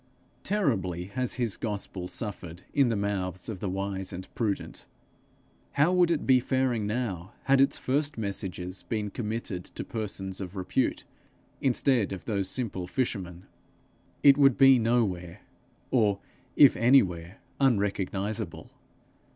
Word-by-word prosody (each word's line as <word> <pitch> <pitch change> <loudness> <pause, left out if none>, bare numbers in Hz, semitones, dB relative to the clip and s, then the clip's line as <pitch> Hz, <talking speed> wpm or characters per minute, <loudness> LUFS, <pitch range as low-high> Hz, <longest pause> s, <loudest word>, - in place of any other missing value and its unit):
Terribly 110 - 0
has 125 +1 -1
his 120 -5 -1
gospel 100 -4 -4
suffered 90 -5 -5
in 140 -4 +4
the 115 - +1
mouths 95 -3 -2
of 105 -4 -5
the 100 - -3
wise 95 0 -3
and 90 +1 -7
prudent: 105 -4 -3 0.9
how 150 +6 +3
would 180 -2 +4
it 165 -3 0
be 130 -1 +5
faring 125 -4 0
now, 105 -5 -3
had 135 0 +4
its 135 - +3
first 145 +2 -1
messages 95 -3 -4
been 105 -3 -3
committed 110 -5 -4
to - - -7
persons 95 -4 -4
of 95 +1 -6
repute, 95 -2 -1 0.6
instead 125 -4 +2
of 95 - -8
those 100 -4 -1
simple 100 -8 -3
fishermen? 90 -6 -3 0.8
It 140 0 +7
would 135 -3 +5
be 135 -2 +7
nowhere, 105 -7 0 0.5
or, 105 -5 +3 0.4
if 140 -3 +7
anywhere, 95 -8 +3 0.2
unrecognizable. 100 -4 -1
105 Hz, 130 wpm, -28 LUFS, 95-130 Hz, 0.9 s, It